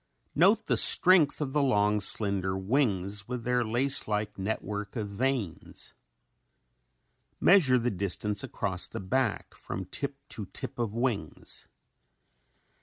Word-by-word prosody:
Note 195 +9 +3
the - - 0
strength 175 -5 +6
of 135 -2 -3
the 150 - +1
long, 105 -6 +1
slender 100 -2 +1
wings 100 -2 -1
with 125 -1 -5
their 125 0 0
lace 130 +5 +2
like 105 -1 -3
network 105 0 -5
of 110 -3 -3
veins. 115 - -4 1.5
Measure 160 -10 +5
the 120 0 -1
distance 100 +2 -2
across 95 -3 -3
the - - -7
back 120 +4 -2
from 95 - -7
tip 140 +9 -5
to 105 -4 -7
tip - - -9
of 115 -2 -3
wings. 115 - -4
110 Hz, 125 wpm, -28 LUFS, 100-130 Hz, 1.5 s, strength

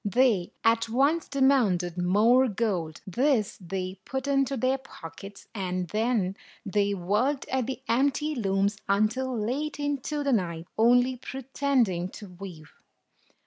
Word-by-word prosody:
They 215 -4 +2
at 230 0 +3
once 280 +8 +2
demanded 235 -11 +2
more 215 +9 +4
gold. 190 -8 -2
This 240 - +1
they 185 +1 -4
put 265 +4 -4
into 275 -1 +1
their 260 +3 +1
pockets; 195 -4 -11
and 185 -4 -3
then 215 -4 0 0.3
they 200 0 +1
worked 210 +10 0
at 260 -2 0
the 265 0 -5
empty 280 +5 +1
looms 200 -4 0
until 230 +6 +1
late 280 +8 -2
into 290 +1 -2
the 280 -2 +1
night, 170 -6 -1
only 245 +3 +4
pretending 255 -8 -1
to 205 - -10
weave. 180 -4 -10
225 Hz, 130 wpm, -27 LUFS, 190-265 Hz, 0.3 s, more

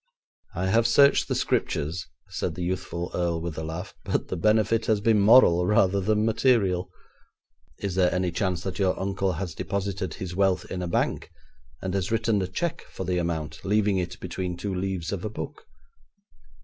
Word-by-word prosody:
'I 90 +1 -1
have 115 +3 +4
searched 140 0 +5
the - - -1
Scriptures,' 75 +2 -1 0.2
said - - -3
the 90 - -4
youthful 90 -1 -3
Earl 85 -2 0
with 85 -1 -5
a 80 - -4
laugh, 80 +5 -6
'but - - -2
the - - -2
benefit 110 +4 +2
has 110 -2 +3
been 110 0 +3
moral 100 -5 +6
rather 100 -1 +3
than 105 +2 +1
material.' 100 -6 +2 0.9
'Is 100 -2 -3
there 90 -1 +3
any 90 0 0
chance 90 0 -1
that 95 - -4
your 95 -2 +1
uncle 95 -1 -1
has 90 0 -4
deposited 100 0 -3
his 90 -2 -6
wealth 95 -1 +2
in 90 - -3
a 90 - -2
bank, 85 - -1 0.5
and 95 -1 -2
has 95 0 -1
written 110 -2 +1
a 95 - -1
cheque 170 - -3
for - - -6
the 90 0 0
amount, 80 -2 -3
leaving 105 -1 +2
it 90 - -4
between 90 -2 -4
two 100 +2 -3
leaves 90 -3 -3
of 100 -3 -3
a 110 - -2
book?' 80 -7 -7
95 Hz, 185 wpm, -26 LUFS, 90-105 Hz, 0.9 s, moral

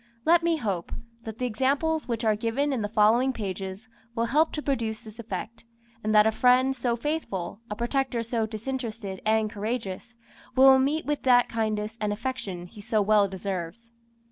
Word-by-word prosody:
Let 340 +1 +5
me 335 -1 +1
hope, 195 - -3 0.3
that 220 -1 -6
the 250 - -2
examples 275 +7 0
which 235 -1 -2
are 215 -1 +3
given 245 +6 0
in 250 - -1
the 205 - -2
following 225 +5 +4
pages 195 -1 -5 0.3
will 230 0 +1
help 300 +7 +2
to 300 - -2
produce 230 -5 -1
this 220 -1 -12
effect, 230 0 -6 0.4
and 215 - 0
that 210 0 +7
a 220 - +4
friend 255 +3 +4
so 245 -2 0
faithful, 230 - -3
a 210 - -3
protector 240 +1 -1
so 230 -1 -1
disinterested 220 -3 -5
and 220 0 +3
courageous, 220 +1 -4 0.4
will 265 0 +7
meet 290 +4 0
with 295 +1 -1
that 245 -2 +4
kindness 220 0 -2
and 210 -1 0
affection 210 -5 -4
he 205 +4 -12
so 220 0 0
well 205 0 +4
deserves. 195 +3 -5
230 Hz, 175 wpm, -27 LUFS, 210-260 Hz, 0.4 s, that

